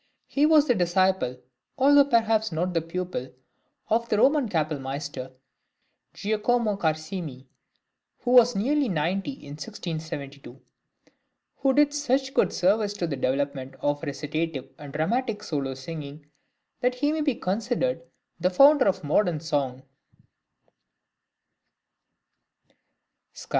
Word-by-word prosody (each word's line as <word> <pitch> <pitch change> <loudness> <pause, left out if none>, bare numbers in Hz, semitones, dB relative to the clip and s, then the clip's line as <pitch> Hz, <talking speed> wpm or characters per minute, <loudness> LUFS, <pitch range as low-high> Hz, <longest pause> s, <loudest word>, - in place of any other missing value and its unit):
He 290 +2 +2
was 310 -2 +5
the 245 - +4
disciple, 185 - +1 0.4
although 285 +1 +6
perhaps 225 -4 +2
not 175 +3 -1
the 165 - +1
pupil, 165 -5 -4 0.6
of 230 +1 0
the 210 - +2
Roman 275 +1 +3
kapellmeister, 145 -5 -3 0.8
Giacomo 215 +1 0
Carissimi 155 -5 -3 0.8
(who 245 - -1
was 245 -1 +6
nearly 270 +6 +1
ninety 185 - -1
in 145 - -12
1672), 150 - -7 1.0
who 270 -1 +2
did 290 0 +4
such 270 -2 0
good - - +2
service 205 +3 +1
to 180 - -3
the 155 -4 -3
development 135 0 -2
of 145 0 -1
recitative 150 -2 -4
and 145 -2 -9
dramatic 210 - -1
solo 135 -6 -3
singing, 145 +1 -8 0.5
that 250 0 +1
he 290 +4 +1
may 315 0 -1
be 285 -4 +1
considered 230 +3 -1 0.4
the 180 +2 +2
founder 275 +8 +6
of 190 -2 0
modern 160 +2 +1
song. 140 -5 -2
185 Hz, 115 wpm, -26 LUFS, 150-245 Hz, 1.0 s, although